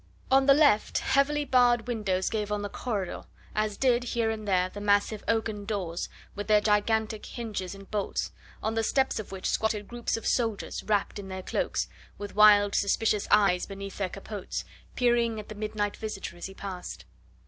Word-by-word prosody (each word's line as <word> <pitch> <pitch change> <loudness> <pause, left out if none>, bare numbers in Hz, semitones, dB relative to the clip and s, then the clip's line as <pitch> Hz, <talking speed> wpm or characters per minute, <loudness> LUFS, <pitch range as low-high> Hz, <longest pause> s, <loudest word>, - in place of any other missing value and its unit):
On 270 +1 +5
the 275 - +8
left, 290 -8 +4
heavily 290 +2 +2
barred 245 -3 +4
windows 200 -6 -1
gave 210 -2 -2
on 205 0 -1
the 205 - -3
corridor, 200 -5 -3 0.3
as 215 -1 -1
did 245 -2 +3
here 230 -2 0
and 215 -1 -5
there 185 -2 +3
the 205 +2 -9
massive 205 +1 +2
oaken 220 -2 0
doors, 190 -5 -3 0.2
with 205 0 -5
their 210 -1 +6
gigantic 215 +1 +1
hinges 210 -6 -5
and 195 0 -13
bolts, 210 -2 -2 0.3
on 220 - 0
the 225 - +1
steps 265 +2 +1
of 215 - -7
which 190 -1 -4
squatted 215 -2 0
groups 240 -1 -2
of 225 - -8
soldiers 225 -4 0
wrapped 205 -1 0
in 195 - -7
their 190 0 -6
cloaks, - - -1 0.3
with 205 0 -7
wild, 205 -1 +6
suspicious 210 +1 +1
eyes 195 -4 +4
beneath 195 0 -7
their 190 -2 0
capotes, 200 +1 -6 0.3
peering 235 -2 +2
at 210 - -9
the - - -5
midnight 210 -1 -2
visitor 210 -5 -5
as 175 - -6
he 195 - -12
passed. 190 -3 -7
210 Hz, 180 wpm, -28 LUFS, 200-225 Hz, 0.3 s, the